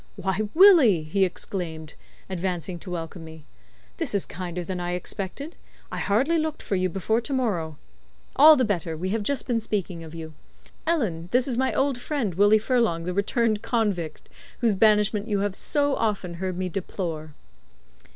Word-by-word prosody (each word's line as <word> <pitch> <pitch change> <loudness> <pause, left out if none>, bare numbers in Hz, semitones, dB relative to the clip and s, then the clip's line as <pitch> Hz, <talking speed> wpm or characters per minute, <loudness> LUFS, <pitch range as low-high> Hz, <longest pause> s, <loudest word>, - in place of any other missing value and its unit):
"Why, 200 +2 -2
Willie," 315 - +7
he 175 +6 +1
exclaimed, 165 -4 -5 0.3
advancing 180 -2 -3
to 180 - -10
welcome 170 0 -5
me, 160 -1 -12 0.5
"this - - -1
is 200 - +1
kinder 180 0 -5
than 180 +1 -4
I 175 0 -2
expected. 195 - -5 0.4
I - - -4
hardly 270 +12 +2
looked 310 -1 -3
for 200 - -1
you 185 0 +1
before 210 +5 0
to 240 - -6
morrow. 175 - -1 0.6
All 310 +3 +9
the 260 -3 +2
better; 170 -6 -2
we 185 +4 -3
have 220 +2 0
just 275 +7 -1
been 235 -3 0
speaking 195 -6 -3
of 160 0 -10
you. 160 -1 -7 0.5
Ellen, 195 - 0
this 250 +1 +2
is 255 - 0
my 260 +2 +1
old 270 -2 +1
friend, 250 - -2
Willie 205 +4 +5
Furlong, 220 -7 +1
the 180 +1 -3
returned 215 +2 +1
convict, 200 -9 -2 0.3
whose 230 -4 +3
banishment 210 +1 +3
you 205 -3 0
have 205 -1 -1
so 285 +6 0
often 200 -5 -1
heard 185 -1 -2
me 185 0 -1
deplore." 165 -4 -5
195 Hz, 170 wpm, -25 LUFS, 175-230 Hz, 0.6 s, All